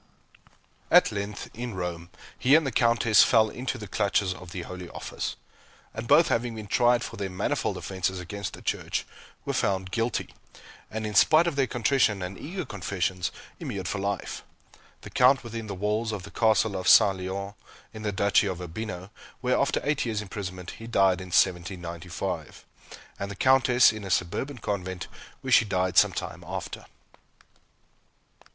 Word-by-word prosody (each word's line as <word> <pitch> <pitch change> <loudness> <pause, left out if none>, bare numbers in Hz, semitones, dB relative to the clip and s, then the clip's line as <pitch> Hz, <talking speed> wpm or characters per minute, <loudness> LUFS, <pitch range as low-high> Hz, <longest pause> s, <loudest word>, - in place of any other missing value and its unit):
At - - +6
length, 100 0 -5
in 120 -2 -5
Rome, 85 -1 -4 0.3
he 135 +4 +5
and 160 -1 +4
the 135 - -1
Countess 115 -1 +4
fell 110 -2 +4
into 130 +1 -4
the 105 -3 -8
clutches 100 -1 +1
of 90 -1 -11
the 90 -1 -5
Holy 90 0 -8
Office; - - -5 0.6
and - - -6
both - - +6
having 115 0 0
been 110 -1 -7
tried 120 +3 +3
for 115 - -7
their 100 -1 -3
manifold 90 0 -1
offences 95 0 -2
against 100 +2 -5
the - - -11
Church, - - -2 0.4
were - - -1
found 95 -1 0
guilty, 115 +3 -2 0.6
and, 110 0 -4
in 105 - -4
spite 155 +9 +6
of 170 -4 -1
their 135 -2 +2
contrition 115 -4 +1
and 90 +2 -5
eager 180 - -5
confessions, 95 -3 -2 0.3
immured 95 -3 -4
for 105 - -2
life; 100 0 -3 0.6
the - - -10
Count 125 +1 +4
within 115 -1 -6
the 100 - -5
walls 105 +4 -1
of 105 -4 -5
the 100 - -10
Castle 110 -2 +2
of 95 0 -3
Sante 95 -2 +7
Leone, 100 +2 -4 0.4
in 110 - -8
the 105 -1 -1
Duchy 100 +1 +3
of 90 -2 -3
Urbino, 90 +1 -6 0.3
where, 125 0 +2
after 140 - +1
eight 145 -1 0
years' 110 -3 -2
imprisonment, 95 -3 -6
he 115 - -8
died 95 -5 +3
in 95 - -8
1795, 85 -1 -1 0.5
and 100 - -3
the 100 - -6
Countess 125 0 +5
in 110 -1 -7
a 95 - -6
suburban 90 +10 -1
convent, 95 -4 -4 0.4
where 130 0 -4
she 125 - +7
died 95 -3 -1
some - - +6
time - - -6
after. - - -6
100 Hz, 170 wpm, -27 LUFS, 95-115 Hz, 0.6 s, Sante